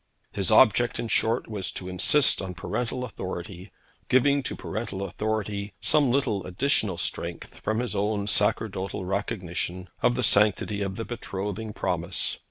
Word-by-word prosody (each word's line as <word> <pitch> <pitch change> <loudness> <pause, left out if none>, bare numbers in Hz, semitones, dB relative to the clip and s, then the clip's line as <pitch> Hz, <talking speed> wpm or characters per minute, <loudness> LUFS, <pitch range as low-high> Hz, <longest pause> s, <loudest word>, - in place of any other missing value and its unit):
His 100 -2 -1
object, 120 +1 +5
in 115 - -3
short, 115 +2 +1
was 105 -4 -3
to 90 - -5
insist 115 +11 +4
on 95 -2 -5
parental 125 +6 -3
authority, 95 -4 -6 0.4
giving 140 +2 +4
to - - -3
parental 100 -2 -4
authority 105 +1 -2
some 145 -4 +3
little 120 -7 +1
additional 100 -1 +1
strength - - -4
from 110 - -1
his 125 0 -2
own 105 0 0
sacerdotal 100 -2 0
recognition 90 -2 -3
of 120 - +3
the 125 - 0
sanctity 105 -1 +3
of 100 -1 -2
the 115 - -4
betrothing 105 -1 -4
promise. 90 -3 -2
105 Hz, 145 wpm, -27 LUFS, 95-115 Hz, 0.4 s, object